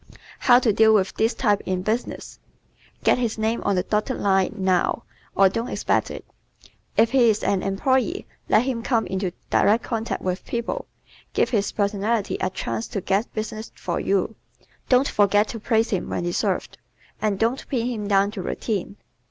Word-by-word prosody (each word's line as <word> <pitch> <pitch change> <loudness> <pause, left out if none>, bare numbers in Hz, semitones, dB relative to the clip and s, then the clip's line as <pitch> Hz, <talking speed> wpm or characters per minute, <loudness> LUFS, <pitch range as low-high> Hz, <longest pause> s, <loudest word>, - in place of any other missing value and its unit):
How 245 -2 +6
to 240 -4 +2
Deal 220 +1 +5
with 190 -2 +1
this 225 +2 +1
Type 205 -5 +1
in 185 -1 -2
Business 225 +4 -3 0.6
¶ - - -27
Get - - +3
his 235 -3 -1
name 220 +2 0
on 200 - +1
the 180 - +1
dotted 215 +6 -1
line 195 0 +1
NOW, 185 -2 +1 0.3
or 195 - +6
don't 230 +5 -2
expect - - 0
it. - - -8 0.7
If 225 0 +4
he 250 -4 +5
is 215 -1 0
an 195 -2 +1
employee 260 - 0 0.2
let 220 - +5
him 255 -3 -2
come 230 -2 +1
into 190 0 -2 0.2
direct 220 +3 +3
contact 225 -1 -3
with 185 0 -2
people, 235 -1 -3 0.5
give - - +1
his 210 -4 +1
personality 205 +1 0
a 185 - +1
chance 115 -11 -4
to 200 - -4
get 195 +5 0
business 215 0 -5
for 175 - -3
you, 200 +3 0 0.5
don't 255 +2 +4
forget 205 +1 +3
to 230 - -5
praise 225 +1 +1
him 190 - -1
when - - -2
deserved, 175 0 -2 0.4
and 210 -2 0
don't 230 +6 -1
pin 240 -5 0
him 225 -4 -3
down 200 0 +3
to 205 -3 -5
routine. 200 0 -3
215 Hz, 180 wpm, -23 LUFS, 195-230 Hz, 0.7 s, How